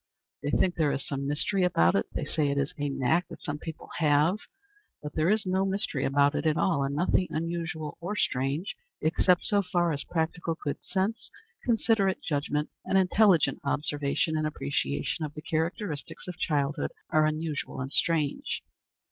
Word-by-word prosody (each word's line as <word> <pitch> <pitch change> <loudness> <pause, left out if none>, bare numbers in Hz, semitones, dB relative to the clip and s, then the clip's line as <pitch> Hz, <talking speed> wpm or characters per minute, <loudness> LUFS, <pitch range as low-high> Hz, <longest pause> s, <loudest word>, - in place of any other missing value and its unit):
They 145 - -2
think 180 +4 +2
there 155 -3 +3
is 140 0 -3
some 140 -1 -3
mystery 175 +7 +1
about 85 - +4
it; 100 - +1
they 155 - -3
say 150 0 +1
it 140 - -1
is 140 0 0
"a 145 -1 -2
knack 140 +6 +1
that - - -11
some 145 0 -3
people 160 0 -8
have;" 155 +5 +3 0.6
but 150 - -5
there 160 +2 +2
is 215 0 +2
no 190 +1 +1
mystery 195 -8 -1
about 140 +1 +3
it 160 - 0
at 155 +1 +2
all, 165 -7 +2
and 140 +1 -2
nothing 180 +3 +2
unusual 165 -1 -3
or 190 +5 -3
strange, 140 +2 -1 0.2
except 175 +3 +3
so 205 -1 +3
far 175 -2 +1
as 140 - -4
practical 165 0 -1
good 145 -1 -3
sense, 210 +4 -2 0.3
considerate 220 -5 +2
judgment, 150 0 -1
and 195 - +1
intelligent 190 -2 +4
observation 145 +2 0
and 155 0 +1
appreciation 70 - -2
of 150 -1 -5
the 150 - -6
characteristics 160 0 -3
of 180 - -5
childhood 145 -1 0 0.2
are 155 0 +4
unusual 155 -3 -3
and 130 +1 -4
strange. 155 -3 0
155 Hz, 175 wpm, -28 LUFS, 145-180 Hz, 0.6 s, about